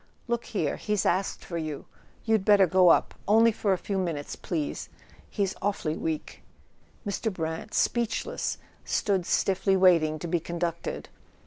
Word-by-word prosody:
"Look 235 Hz, 0 st, -1 dB
here 165 Hz, -9 st, -2 dB
—he's 210 Hz, -3 st, -1 dB
asked 190 Hz, +3 st, 0 dB
for 170 Hz, -2 st, -4 dB
you; 155 Hz, -3 st, -5 dB, 0.4 s
you'd 220 Hz, -3 st, +2 dB
better 205 Hz, -1 st, +6 dB
go 185 Hz, 0 st, +5 dB
up. -, -, +4 dB
Only 225 Hz, +3 st, +6 dB
for 210 Hz, -2 st, -1 dB
a 190 Hz, -, +3 dB
few 195 Hz, +2 st, -3 dB
minutes, 165 Hz, -6 st, -3 dB
please; 155 Hz, -5 st, -4 dB, 0.4 s
he's 200 Hz, -3 st, -1 dB
awfully 190 Hz, -6 st, -1 dB
weak." 160 Hz, -2 st, -4 dB, 0.6 s
Mr. 210 Hz, +2 st, -1 dB
Brant, 160 Hz, +3 st, -4 dB
speechless, 235 Hz, -2 st, 0 dB, 0.3 s
stood 190 Hz, -4 st, 0 dB
stiffly 195 Hz, 0 st, +2 dB
waiting 165 Hz, -4 st, +4 dB
to 170 Hz, -, -6 dB
be 170 Hz, +1 st, +1 dB
conducted. 170 Hz, 0 st, -4 dB
185 Hz, 145 wpm, -27 LUFS, 165-205 Hz, 0.6 s, better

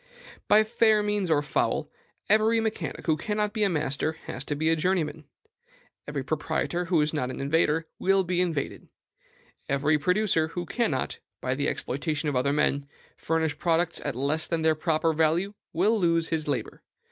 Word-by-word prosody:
By 215 Hz, +1 st, +6 dB
fair 220 Hz, -1 st, +3 dB
means 205 Hz, -3 st, 0 dB
or 150 Hz, -2 st, +3 dB
foul, 145 Hz, -, -1 dB, 0.4 s
every 220 Hz, +2 st, +4 dB
mechanic 220 Hz, -1 st, -3 dB
who 160 Hz, -, +3 dB
cannot 210 Hz, +4 st, -2 dB
be 215 Hz, -, -2 dB
a 200 Hz, -, +3 dB
master 150 Hz, -1 st, -1 dB
has 125 Hz, -, -5 dB
to 145 Hz, -, -2 dB
be 160 Hz, +2 st, +1 dB
a 165 Hz, -, +4 dB
journeyman; 160 Hz, -2 st, -1 dB, 0.8 s
every 145 Hz, -2 st, -3 dB
proprietor 160 Hz, +4 st, -1 dB
who 170 Hz, -2 st, +2 dB
is 150 Hz, +1 st, 0 dB
not 130 Hz, -5 st, -1 dB
an 130 Hz, -, -6 dB
invader 155 Hz, +3 st, +1 dB
will 195 Hz, 0 st, +3 dB
be 180 Hz, 0 st, 0 dB
invaded; 165 Hz, -6 st, -2 dB, 0.8 s
every 145 Hz, +2 st, +2 dB
producer 180 Hz, 0 st, +2 dB
who 175 Hz, +2 st, -5 dB
cannot, 165 Hz, -, -1 dB, 0.2 s
by 130 Hz, -, -1 dB
the 140 Hz, +2 st, -1 dB
exploitation 150 Hz, +3 st, -2 dB
of 140 Hz, -, -2 dB
other 130 Hz, +3 st, +2 dB
men, 145 Hz, -1 st, +1 dB, 0.3 s
furnish 160 Hz, -2 st, -1 dB
products 170 Hz, 0 st, +1 dB
at 145 Hz, -4 st, -3 dB
less 145 Hz, +5 st, -1 dB
than 165 Hz, -1 st, -1 dB
their 160 Hz, 0 st, +4 dB
proper 160 Hz, 0 st, +1 dB
value, 165 Hz, +6 st, +1 dB, 0.2 s
will 210 Hz, +6 st, +2 dB
lose 165 Hz, -2 st, +2 dB
his 155 Hz, -2 st, -1 dB
labor. 145 Hz, -, -3 dB
160 Hz, 170 wpm, -27 LUFS, 150-185 Hz, 0.8 s, By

